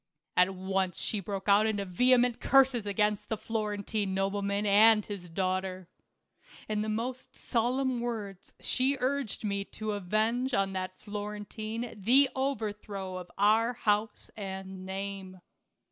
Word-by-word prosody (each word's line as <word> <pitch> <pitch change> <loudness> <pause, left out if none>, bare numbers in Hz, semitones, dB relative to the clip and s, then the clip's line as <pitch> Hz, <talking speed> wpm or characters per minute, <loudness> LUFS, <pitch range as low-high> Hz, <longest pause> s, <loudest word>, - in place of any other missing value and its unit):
At 180 +1 +4
once 190 -1 -1
she 215 - -1
broke 195 0 -5
out 205 +2 +5
into 205 -2 -1
vehement 245 +5 +3
curses 260 -5 +4
against 210 +1 0
the 220 - -1
Florentine 210 -2 -2
nobleman 200 +1 0
and 210 +1 +6
his 190 -4 -7
daughter. 185 0 -2 0.8
In 215 -1 -1
the 215 - -2
most 245 +4 -4
solemn 250 +1 0
words 210 -6 -5
she 265 +2 +1
urged 265 -4 -1
me 200 -1 -1
to 215 +1 -5
avenge 220 +6 0
on 195 -1 +1
that 185 0 -4
Florentine 210 +2 -5
the 260 +7 +5
overthrow 210 -7 -3
of 180 -1 -8
our 220 +4 +4
house 210 -2 -1
arid 190 -2 -5
name. 190 0 -6
210 Hz, 130 wpm, -30 LUFS, 195-230 Hz, 0.8 s, and